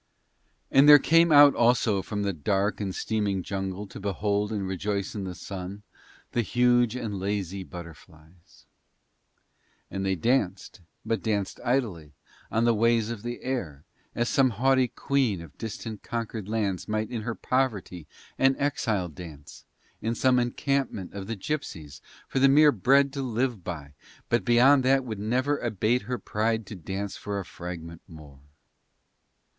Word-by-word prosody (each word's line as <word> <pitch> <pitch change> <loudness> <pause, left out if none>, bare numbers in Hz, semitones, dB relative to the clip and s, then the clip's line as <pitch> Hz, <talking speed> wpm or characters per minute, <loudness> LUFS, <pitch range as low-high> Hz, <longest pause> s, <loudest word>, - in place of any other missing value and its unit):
And 140 +2 +6
there 145 - +12
came 165 +3 +4
out 145 -1 +8
also 115 -4 +2
from 105 +1 -4
the 100 -1 -1
dark 100 +7 0
and 95 -2 -3
steaming 100 -4 -1
jungle 95 +1 -4
to - - -10
behold 100 +1 -1
and 100 -3 -2
rejoice 100 +1 -2
in 100 -3 -4
the 90 -1 -6
Sun 95 +2 -7 0.5
the 120 - +1
huge 120 +1 +2
and 110 -6 -4
lazy 100 -1 -3
butterflies. 85 -1 -14 1.3
And 95 0 -3
they 95 -1 +1
danced, 100 -2 -1 0.2
but 115 - -1
danced 100 -4 -2
idly, 105 - -1 0.4
on 115 +1 +1
the 120 - +4
ways 115 0 +2
of 115 -3 -6
the 120 +1 -6
air, 90 - -4 0.3
as 120 - 0
some 135 +1 +3
haughty 130 +3 +2
queen 125 -6 0
of 80 -4 -12
distant 110 -1 -6
conquered 110 -3 -5
lands 105 -5 -1
might 110 +1 -2
in 115 -3 -3
her 115 +1 -4
poverty 105 - -2 0.3
and 135 0 +4
exile 115 -10 0
dance, 75 -2 -11 0.4
in 115 +2 -1
some 130 0 +3
encampment 125 -4 -1
of 95 -1 -6
the 115 - -3
gipsies, 95 - -5 0.3
for 135 - -1
the 135 +1 +6
mere 150 +2 +7
bread 135 +5 +3
to 140 - -3
live 120 -4 -1
by, 75 -5 -7 0.4
but 120 - +2
beyond 130 +3 +5
that 135 0 +3
would 110 -4 -5
never 130 +7 0
abate 115 +1 0
her 125 - -1
pride 110 0 -1
to 105 - -8
dance 95 +3 -5
for 100 -1 -4
a 95 - -6
fragment 85 -1 -8
more. 75 -5 -13
105 Hz, 155 wpm, -27 LUFS, 95-125 Hz, 1.3 s, there